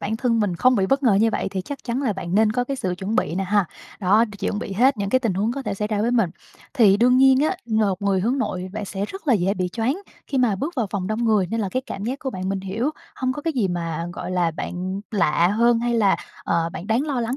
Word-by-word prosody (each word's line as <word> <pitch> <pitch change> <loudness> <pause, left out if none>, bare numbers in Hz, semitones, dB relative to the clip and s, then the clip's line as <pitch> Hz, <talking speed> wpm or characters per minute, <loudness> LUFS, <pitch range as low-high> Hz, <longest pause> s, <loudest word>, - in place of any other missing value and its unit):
bản 220 +2 -2
thân 230 -2 +1
mình 185 -5 0
không 255 +3 +4
bị 190 - +2
bất 270 +6 +1
ngờ 230 -7 +4
như 220 +3 +4
vậy - - -1
thì 190 -1 -2
chắc 275 +9 -6
chắn 245 +3 -2
là 235 -6 +1
bạn 185 -2 -5
nên 215 0 +4
có 245 +2 0
cái 275 +1 -3
sự 185 -7 -2
chuẩn 205 +4 -2
bị 165 - 0
nè 195 - -1
ha. 205 0 +2 0.4
Đó, 205 +4 +4
chuẩn 205 - -2
bị 210 -2 -5
hết 250 +7 +3
những 200 -1 -2
cái 255 - +4
tình 225 -8 -1
huống 210 +5 0
có 275 +1 -4
thể - - -3
xảy 210 +1 -3
ra 210 -2 -1
với 230 +3 +1
mình. 230 -8 +2 0.4
Thì 215 -7 +5
đương 250 +3 +4
nhiên 265 0 +6
á, 315 +5 +1
một 205 -3 +1
người 195 -2 +2
hướng 245 +7 0
nội 185 -7 -2
bạn 215 0 -4
sẽ 195 +1 -3
rất 385 - -9
là 245 - +6
dễ 195 +1 +1
bị 180 -1 -1
choáng 240 - -1 0.3
khi 270 - -1
mà 230 -6 +2
bước 300 - -4
vào 235 - +1
phòng 190 -3 -2
đông 215 +3 -1
người 215 -4 +3
nên 225 +5 -2
là 200 - -1
cái 255 +1 -1
cảm 200 - -5
giác 260 +4 -2
của 265 - -4
bạn 185 -4 -4
mình 195 0 -1
hiểu 220 +9 -2 0.2
hông 255 0 -1
có 295 - -7
cái 325 - -1
gì 230 -9 0
mà, 170 -1 -3
gọi - - -6
là, 175 -2 +1
bạn 185 +4 -4
lạ 175 -5 +2
hơn 235 +3 +3
hay 240 +1 0
là, 205 -4 +3 0.3
ờ, 165 0 +1
bạn 185 - -7
đáng 225 +4 +2
lo 270 -5 -1
lắng 235 +3 -2
215 Hz, 290 wpm, -23 LUFS, 190-245 Hz, 0.4 s, nhiên